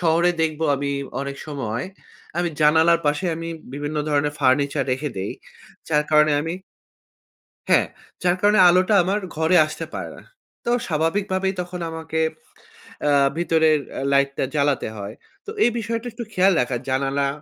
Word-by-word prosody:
শহরে 170 +1 +3
দেখবো 160 0 -1
আমি 140 +1 -2 0.3
অনেক 140 0 -5
সময় 130 -5 -3 0.5
আমি 175 -1 +1
জানালার 160 +2 +5
পাশে 145 +6 +1
আমি 165 0 -5 0.3
বিভিন্ন 145 +1 -4
ধরনের 145 0 +1
ফার্নিচার 140 +1 +2
রেখে 140 +2 -3
দেই 95 +1 -3 0.6
যার 150 -1 +2
কারণে 150 0 +5
আমি 165 +2 -3 1.2
হ্যাঁ, - - +5 0.4
যার 180 0 +2
কারণে 210 0 +4
আলোটা 185 +4 +4
আমার 200 +3 0 0.2
ঘরে 160 +3 +3
আসতে 155 - -6
পারে - - -5
না। - - -13 0.4
তো 240 - -1 0.2
স্বাভাবিক 165 +5 0
ভাবেই 190 0 0
তখন 180 0 -7
আমাকে 160 0 -4 0.9
আ - - +4 0.3
ভিতরের 160 -2 +3 0.2
আ - - -3
লাইটটা 140 0 +2
জ্বালাতে 140 -5 +1
হয়। 100 +2 -7 0.3
তো - - -8
এই 240 - +4
বিষয়টা 230 +1 -3
একটু 235 +1 -6
খেয়াল 190 0 +4
রাখা 125 0 -1
জানালা 135 +1 0
155 Hz, 150 wpm, -22 LUFS, 140-175 Hz, 1.2 s, জানালার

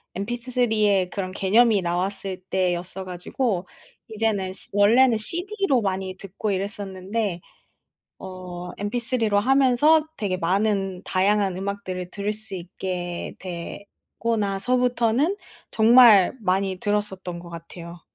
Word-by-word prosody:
MP3의 220 -3 +1
그런 185 -2 -4
개념이 210 +2 +3
나왔을 185 +2 -2
때였어 185 0 -1
가지고 185 +2 -2 0.4
이제는 210 -4 -1
시 - - -6
원래는 225 +4 +5
CD로 355 - 0
많이 190 -1 -2
듣고 200 +2 -4
이랬었는데 195 0 -3 0.8
어 180 -1 -8
MP 205 +4 -2
3 235 -2 0
로 205 0 +3
하면서 270 +6 +4
되게 195 -4 -1
많은 195 +1 0
다양한 195 0 +1
음악들을 190 -2 -4
들을 205 +1 -2
수 215 -2 -5
있게 175 0 -5
되고 195 +5 -5
나서부터는 245 - +1 0.3
정말 225 -4 +7
많이 190 -1 0
들었었던 190 -4 -2
것 170 0 -11
같아요. 170 +1 -10
200 Hz, 260 characters per minute, -24 LUFS, 185-225 Hz, 0.8 s, 정말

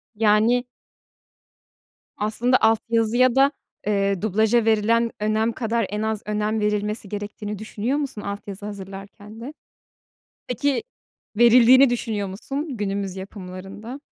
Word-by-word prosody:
Yani 220 +3 +3 1.5
aslında 235 +4 +1
alt 220 0 +4
yazıya 235 +2 +3
da, 275 +1 +5 0.4
eee, 200 -2 +1
dublaja 220 +2 +2
verilen 225 +1 +2
önem 215 +2 +1
kadar 230 -1 -1
en 210 +2 -3
az 220 -1 -1
önem 210 +1 -1
verilmesi 210 0 -1
gerektiğini 205 0 -5
düşünüyor 220 +5 -2
musun 275 -7 -4
alt 200 0 -6
yazı 200 +1 -7
hazırlarken 200 +1 -9
de? 270 +6 -7 0.9
Peki, 255 +2 0 0.5
verildiğini 245 +3 +7
düşünüyor 220 -4 -2
musun 270 - -5
günümüz 200 -2 -3
yapımlarında? 195 +5 -8
215 Hz, 115 wpm, -23 LUFS, 205-235 Hz, 1.5 s, verildiğini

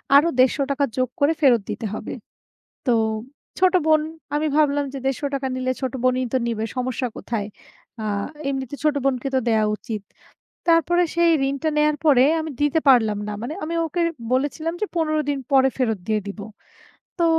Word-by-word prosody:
আরো 295 +4 +7
৳১৫০ 280 +2 +2
যোগ 255 -1 +1
করে 290 +3 +4
ফেরত 245 -6 +5
দিতে 225 - -4
হবে। - - -5 0.7
তো 245 - +4 0.7
ছোট 370 0 +4
বোন 310 -1 +5 0.3
আমি 310 +1 +1
ভাবলাম 290 -2 +3
যে 270 - -4
৳১৫০ 275 0 -1
নিলে 255 0 -1
ছোট 260 -1 -2
বোনই 255 0 +2
তো - - +4
নিবে, 220 -1 -2
সমস্যা 250 0 -1
কোথায়? 215 -3 -3 0.6
আ - - -3 0.4
এমনিতে 270 0 -3
ছোট 300 -1 +2
বোনকে 270 -1 0
তো - - +4
দেয়া 220 -1 +3
উচিত। 215 -1 -6 0.7
তারপরে 340 +2 +4
সেই 340 0 +4 0.2
ঋণটা 280 +3 -1
নেয়ার 300 0 +3
পরে 265 -4 +6 0.2
আমি 315 -1 -4
দিতে 295 +2 +3
পারলাম 220 -5 +4
না। 210 - -3
মানে 245 +6 -4
আমি 335 +2 -3
ওকে 345 +2 -2 0.3
বলেছিলাম 305 +5 -1
যে - - +2
১৫ 310 -2 +1
দিন 280 -1 0
পরে 265 -1 +5
ফেরত 225 -6 0
দিয়ে 215 -1 +1
দিব। 200 +1 -7 0.8
তো 340 - +3
275 Hz, 170 wpm, -22 LUFS, 250-310 Hz, 0.8 s, আরো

